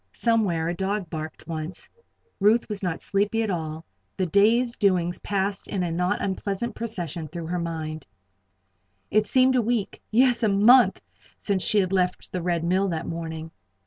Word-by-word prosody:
Somewhere 205 Hz, -9 st, +1 dB
a 170 Hz, -, 0 dB
dog 190 Hz, 0 st, -2 dB
barked 155 Hz, -1 st, -6 dB
once. 160 Hz, +1 st, -4 dB, 0.5 s
Ruth 215 Hz, +4 st, +4 dB
was 210 Hz, -2 st, -5 dB
not 180 Hz, -4 st, -2 dB
sleepy 205 Hz, +3 st, 0 dB
at 215 Hz, -, -1 dB
all. 160 Hz, -2 st, -4 dB, 0.3 s
The 190 Hz, -, +1 dB
day's 225 Hz, +7 st, +3 dB
doings 180 Hz, -3 st, +1 dB
passed 200 Hz, 0 st, -2 dB
in 190 Hz, -3 st, -2 dB
a 170 Hz, -, -2 dB
not 180 Hz, +4 st, 0 dB
unpleasant 200 Hz, +4 st, -2 dB
procession 175 Hz, -8 st, -4 dB
through 170 Hz, +1 st, -6 dB
her 175 Hz, +2 st, -2 dB
mind. 160 Hz, -3 st, -5 dB, 1.0 s
It 215 Hz, 0 st, +3 dB
seemed 260 Hz, +2 st, +4 dB
a 250 Hz, -, +4 dB
week 230 Hz, -2 st, -2 dB
yes! 245 Hz, +2 st, +3 dB
a 220 Hz, -, +3 dB
month 210 Hz, +1 st, +5 dB, 0.3 s
since 195 Hz, -3 st, -1 dB
she 210 Hz, -, +2 dB
had 190 Hz, -2 st, +2 dB
left 180 Hz, -1 st, 0 dB
the 180 Hz, -, -3 dB
Red 170 Hz, -1 st, 0 dB
Mill 185 Hz, +3 st, +2 dB
that 165 Hz, -3 st, -3 dB
morning. 160 Hz, -1 st, -5 dB
190 Hz, 170 wpm, -25 LUFS, 170-210 Hz, 1.0 s, month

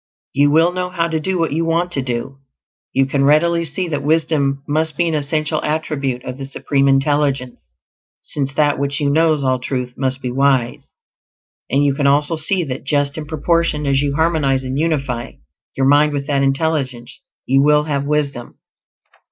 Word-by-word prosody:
You 145 Hz, +1 st, +3 dB
will 165 Hz, +4 st, +4 dB
know 180 Hz, 0 st, -3 dB
how 170 Hz, -2 st, -1 dB
to 160 Hz, -1 st, -1 dB
do 185 Hz, +4 st, -2 dB
what 165 Hz, -2 st, 0 dB
you 160 Hz, +3 st, 0 dB
want 165 Hz, +2 st, 0 dB
to 140 Hz, -, -1 dB
do. 130 Hz, +2 st, -4 dB, 0.5 s
You 135 Hz, -, +2 dB
can 140 Hz, +1 st, 0 dB
readily 170 Hz, +4 st, +3 dB
see 165 Hz, +3 st, -3 dB
that 145 Hz, -2 st, -2 dB
wisdom 145 Hz, -2 st, 0 dB
must 155 Hz, 0 st, -1 dB
be 170 Hz, -, +2 dB
an 165 Hz, -, -1 dB
essential 155 Hz, +1 st, -1 dB
attribute 145 Hz, -5 st, -2 dB
of 130 Hz, +1 st, -6 dB
the 135 Hz, -, -5 dB
Supreme 140 Hz, 0 st, 0 dB
Intelligence, 135 Hz, -2 st, +1 dB, 0.6 s
since 140 Hz, -2 st, -3 dB
That 145 Hz, -2 st, +2 dB
which 140 Hz, 0 st, -2 dB
knows 155 Hz, +1 st, +2 dB
all 130 Hz, -1 st, +1 dB
truth 125 Hz, -1 st, -4 dB
must 130 Hz, -1 st, -1 dB
be 125 Hz, -, -2 dB
wise; 135 Hz, 0 st, +1 dB, 0.8 s
and 140 Hz, +1 st, +2 dB
you 140 Hz, -, +2 dB
can 140 Hz, 0 st, 0 dB
also 145 Hz, +3 st, +3 dB
see 175 Hz, +4 st, -1 dB
that 135 Hz, -3 st, -5 dB
just 145 Hz, 0 st, 0 dB
in 155 Hz, -2 st, -6 dB
proportion 160 Hz, 0 st, 0 dB
as 135 Hz, -1 st, +2 dB
you 140 Hz, -1 st, -1 dB
harmonize 150 Hz, -5 st, +1 dB
and 130 Hz, 0 st, -4 dB
unify 140 Hz, -7 st, -2 dB, 0.4 s
your 135 Hz, -, +2 dB
mind 145 Hz, +2 st, +4 dB
with 140 Hz, -1 st, -3 dB
that 140 Hz, -1 st, 0 dB
Intelligence 135 Hz, -, -1 dB, 0.2 s
you 135 Hz, +1 st, +3 dB
will 150 Hz, +1 st, +4 dB
have 145 Hz, -2 st, -2 dB
wisdom. 140 Hz, -4 st, -2 dB
145 Hz, 180 wpm, -18 LUFS, 135-155 Hz, 0.8 s, will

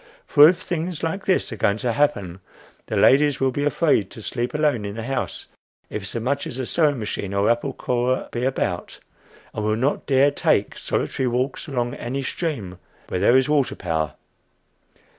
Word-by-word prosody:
For 150 Hz, +1 st, +8 dB
if 180 Hz, -, +1 dB
things 170 Hz, -1 st, -4 dB
like 165 Hz, +4 st, -2 dB
this 185 Hz, -7 st, +1 dB
are -, -, -7 dB
going 100 Hz, +1 st, +2 dB
to 120 Hz, +1 st, -1 dB
happen, 100 Hz, -12 st, 0 dB, 0.5 s
the -, -, -2 dB
ladies 145 Hz, +1 st, +4 dB
will 135 Hz, -1 st, +2 dB
be 145 Hz, +3 st, -2 dB
afraid 145 Hz, -, +2 dB
to 110 Hz, -, -11 dB
sleep 120 Hz, +5 st, -3 dB
alone 150 Hz, -7 st, +1 dB
in 100 Hz, 0 st, -5 dB
the 115 Hz, -, -5 dB
house 130 Hz, +1 st, -3 dB, 0.5 s
if 100 Hz, -2 st, -4 dB
so 115 Hz, -, -3 dB
much 140 Hz, +5 st, -1 dB
as 125 Hz, -, -6 dB
a 130 Hz, -, -2 dB
sewing 150 Hz, 0 st, +2 dB
machine 100 Hz, -3 st, -4 dB
or 100 Hz, +3 st, +3 dB
apple 120 Hz, +4 st, -1 dB
corer 125 Hz, 0 st, -1 dB
be 120 Hz, -, -3 dB
about, 110 Hz, -9 st, -2 dB, 0.5 s
and 110 Hz, -, -3 dB
will 110 Hz, 0 st, +1 dB
not 130 Hz, +6 st, -1 dB
dare 140 Hz, +1 st, +4 dB
take -, -, +1 dB
solitary 130 Hz, -, -2 dB
walks 125 Hz, +6 st, -1 dB
along 120 Hz, -4 st, -2 dB
any 135 Hz, +3 st, -4 dB
stream 125 Hz, -, -4 dB, 0.3 s
where 90 Hz, -, -1 dB
there 120 Hz, +7 st, +5 dB
is 130 Hz, 0 st, +2 dB
a -, -, -1 dB
water 145 Hz, -4 st, +2 dB
power. 80 Hz, -5 st, -2 dB
130 Hz, 190 wpm, -23 LUFS, 110-145 Hz, 0.5 s, For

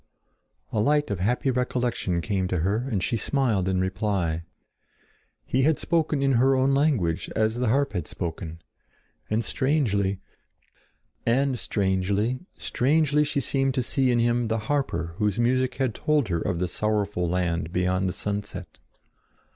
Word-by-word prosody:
A 110 Hz, -, 0 dB
light 145 Hz, +3 st, +2 dB
of 100 Hz, -, -2 dB
happy 125 Hz, +7 st, +1 dB
recollection 125 Hz, -8 st, -1 dB
came 95 Hz, -1 st, -1 dB
to 90 Hz, -3 st, -1 dB
her 105 Hz, +9 st, 0 dB
and 100 Hz, -7 st, -1 dB
she -, -, 0 dB
smiled 110 Hz, -6 st, 0 dB
in 95 Hz, -1 st, +1 dB
reply. 95 Hz, -3 st, -1 dB, 1.0 s
He 130 Hz, -, +1 dB
had 155 Hz, +3 st, +3 dB
spoken 160 Hz, -4 st, 0 dB
in 135 Hz, -, +3 dB
her 135 Hz, +1 st, +4 dB
own 130 Hz, +1 st, +3 dB
language 135 Hz, -, +1 dB
as 110 Hz, +1 st, +1 dB
the 125 Hz, 0 st, 0 dB
harp 140 Hz, +2 st, +1 dB
had 90 Hz, -6 st, -3 dB
spoken, 85 Hz, -1 st, -6 dB, 0.7 s
and 110 Hz, +2 st, +1 dB
strangely, 105 Hz, -8 st, 0 dB, 1.3 s
strangely 100 Hz, +2 st, 0 dB, 0.2 s
she 150 Hz, +1 st, +1 dB
seemed 135 Hz, 0 st, 0 dB
to 130 Hz, -, +1 dB
see 130 Hz, +1 st, +1 dB
in 120 Hz, -, +3 dB
him 120 Hz, 0 st, +2 dB
the 110 Hz, +1 st, 0 dB
harper 130 Hz, -, -1 dB
whose 105 Hz, -1 st, 0 dB
music 130 Hz, +2 st, +1 dB
had 130 Hz, -4 st, 0 dB
told 150 Hz, -5 st, +1 dB
her 85 Hz, -2 st, 0 dB
of 85 Hz, -, -1 dB
the 90 Hz, +1 st, 0 dB
sorrowful 100 Hz, -2 st, -1 dB
land 85 Hz, -2 st, -1 dB
beyond 90 Hz, +1 st, +1 dB
the -, -, -3 dB
sunset. 105 Hz, 0 st, -4 dB
110 Hz, 145 wpm, -25 LUFS, 95-130 Hz, 1.3 s, her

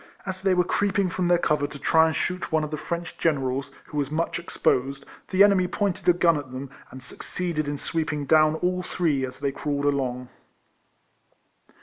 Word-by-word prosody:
As 190 Hz, -1 st, -4 dB
they 190 Hz, -1 st, +3 dB
were 180 Hz, -, +4 dB
creeping 200 Hz, +1 st, +1 dB
from 175 Hz, +1 st, -1 dB
their 175 Hz, 0 st, +5 dB
cover 150 Hz, -4 st, +1 dB
to 145 Hz, -, -9 dB
try 160 Hz, +3 st, +4 dB
and 160 Hz, -, -1 dB
shoot 180 Hz, -1 st, -2 dB
one 160 Hz, -1 st, +2 dB
of 150 Hz, -, -4 dB
the -, -, -1 dB
French 170 Hz, +3 st, -5 dB
generals, 135 Hz, -4 st, 0 dB, 0.2 s
who 150 Hz, -, -7 dB
was 140 Hz, -1 st, -1 dB
much 165 Hz, +3 st, -1 dB
exposed, 135 Hz, -4 st, 0 dB, 0.2 s
the 190 Hz, +1 st, +5 dB
enemy 195 Hz, -3 st, +4 dB
pointed 190 Hz, -1 st, -1 dB
a -, -, +7 dB
gun 170 Hz, -2 st, +3 dB
at 145 Hz, -3 st, -6 dB
them, 130 Hz, +1 st, -7 dB, 0.2 s
and 130 Hz, 0 st, -11 dB
succeeded 165 Hz, +1 st, -3 dB
in 145 Hz, 0 st, -2 dB
sweeping 155 Hz, -1 st, -2 dB
down 155 Hz, +1 st, +4 dB
all 180 Hz, +2 st, 0 dB
three, 160 Hz, -6 st, 0 dB
as 130 Hz, -1 st, -5 dB
they 140 Hz, -1 st, 0 dB
crawled 145 Hz, 0 st, -2 dB
along. 125 Hz, -3 st, -1 dB
155 Hz, 195 wpm, -25 LUFS, 140-180 Hz, 0.2 s, a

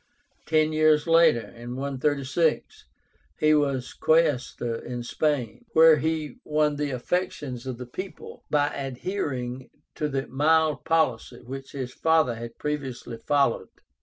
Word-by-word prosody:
Ten 155 Hz, 0 st, +2 dB
years 155 Hz, -1 st, +4 dB
later 165 Hz, -7 st, +4 dB
(136) 140 Hz, +5 st, -1 dB, 0.5 s
he 155 Hz, 0 st, +4 dB
was 140 Hz, -4 st, 0 dB
Quaestor 130 Hz, -7 st, +1 dB
in 120 Hz, -1 st, -5 dB
Spain, 145 Hz, -, -1 dB
where 160 Hz, -1 st, +7 dB
he 155 Hz, -1 st, -2 dB
won 150 Hz, -1 st, +1 dB
the 145 Hz, 0 st, -1 dB
affections 130 Hz, -2 st, -3 dB
of 130 Hz, -2 st, -4 dB
the 125 Hz, -, -7 dB
people 185 Hz, +10 st, -8 dB
by 145 Hz, -1 st, +1 dB
adhering 130 Hz, -3 st, -4 dB, 0.2 s
to 150 Hz, -, -2 dB
the 135 Hz, -1 st, -2 dB
mild 155 Hz, +3 st, +2 dB
policy 130 Hz, -7 st, 0 dB
which 135 Hz, +2 st, -8 dB
his 130 Hz, -3 st, -5 dB
father 160 Hz, -6 st, +2 dB
had 115 Hz, 0 st, -8 dB
previously 135 Hz, -5 st, -4 dB
followed. 140 Hz, +1 st, +1 dB
145 Hz, 125 wpm, -26 LUFS, 125-155 Hz, 0.5 s, where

